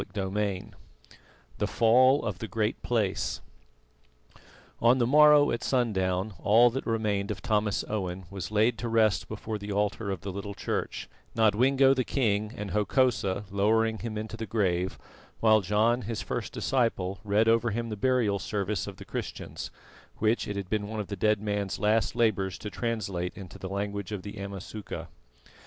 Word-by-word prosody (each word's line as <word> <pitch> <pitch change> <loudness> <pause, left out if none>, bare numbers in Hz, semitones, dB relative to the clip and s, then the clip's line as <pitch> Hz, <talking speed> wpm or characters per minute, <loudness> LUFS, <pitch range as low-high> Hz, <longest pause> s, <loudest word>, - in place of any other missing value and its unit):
CHAPTER 95 -2 -4
XIX 100 -3 -1 0.9
THE - - +1
FALL 130 +5 +4
OF 100 -5 -3
THE 115 - -4
GREAT 110 +1 -1
PLACE 110 -6 -1 1.4
On 120 +2 +5
the 120 - +2
morrow 150 +2 +6
at 120 - -2
sundown 100 -5 0
all 115 +6 +5
that 135 +3 -4
remained 105 -3 0
of 105 - -5
Thomas 105 -2 +1
Owen 95 -3 -3
was 95 -2 -5
laid 110 +2 +2
to 120 - -3
rest 110 -2 +2
before 110 0 -5
the 100 0 -6
altar 105 +1 -1
of 95 -4 -3
the 100 - -5
little 100 +1 -6
church, - - -3 0.3
Nodwengo 130 +5 +4
the 130 -1 0
king 110 -5 0
and 105 -2 -5
Hokosa 105 -2 +1
lowering 110 +2 +2
him 115 -2 -4
into 110 +1 -5
the 110 -1 -5
grave, 95 -4 0 0.4
while 110 -1 +5
John, 110 +5 +2
his 115 -1 -4
first - - -4
disciple, 105 -7 0
read 105 +2 +2
over 115 +1 +3
him 115 +2 -3
the 110 - -3
burial 115 -3 +1
service 100 -2 -2
of - - -8
the - - -10
Christians, - - -6 0.5
which 110 +2 +1
it 105 - -3
had 100 -2 -4
been 105 +1 -1
one 110 0 -5
of 105 - -4
the 100 - -3
dead 105 +2 +2
man's 105 -2 -2
last 110 0 +1
labours 100 -5 +1
to 105 - -7
translate 100 -7 -3
into 95 -3 -10
the 95 - -6
language 100 0 -3
of 100 -3 -4
the 100 +1 -8
Amasuka. 100 +1 -7
105 Hz, 170 wpm, -28 LUFS, 100-115 Hz, 1.4 s, morrow